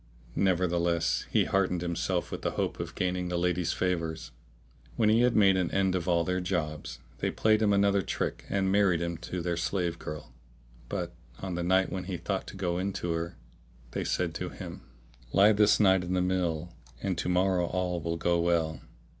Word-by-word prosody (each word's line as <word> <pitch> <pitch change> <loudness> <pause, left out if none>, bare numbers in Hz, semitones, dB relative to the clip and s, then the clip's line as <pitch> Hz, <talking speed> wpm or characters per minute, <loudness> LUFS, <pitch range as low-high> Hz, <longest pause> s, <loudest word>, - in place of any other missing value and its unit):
Nevertheless 85 -3 +1
he - - +3
heartened 90 -3 +1
himself 85 -1 -1
with - - -5
the - - 0
hope - - -1
of - - -5
gaining 90 -1 -1
the 90 - -1
lady's 90 0 +1
favours. 85 -3 -2 0.6
When 110 -2 +3
he 110 +2 +5
had 125 -1 +3
made 95 -3 +5
an 90 -2 +1
end 95 -1 +1
of 90 -1 -2
all 85 -1 +3
their 90 +2 -1
jobs, 80 -5 -3 0.2
they - - 0
played 110 0 +2
him 105 -2 +3
another 100 0 +3
trick - - -3
and 95 -1 +1
married 100 -4 +3
him 85 0 -2
to 90 +1 -5
their 85 -1 -1
slave 85 0 -1
girl; 75 -4 -7 0.6
but, - - -3 0.3
on 95 -2 -3
the 85 - -2
night 95 +2 +2
when 95 -2 -3
he 95 -1 -3
thought 95 +3 -3
to - - -8
go 90 -2 -1
in 95 +1 -1
to 90 -2 -3
her, 85 +1 -3 0.5
they - - -2
said - - -1
to - - -4
him, - - -8 0.5
"Lie 100 +2 +7
this 105 0 +4
night 95 -3 +5
in 90 +1 -3
the 90 - +2
mill; 90 -2 -1 0.3
and 95 -2 0
to - - -1
morrow 90 -1 +2
all 90 -1 -1
will 85 0 -2
go 85 +1 +1
well." 85 -2 +1
90 Hz, 195 wpm, -29 LUFS, 85-95 Hz, 0.6 s, Lie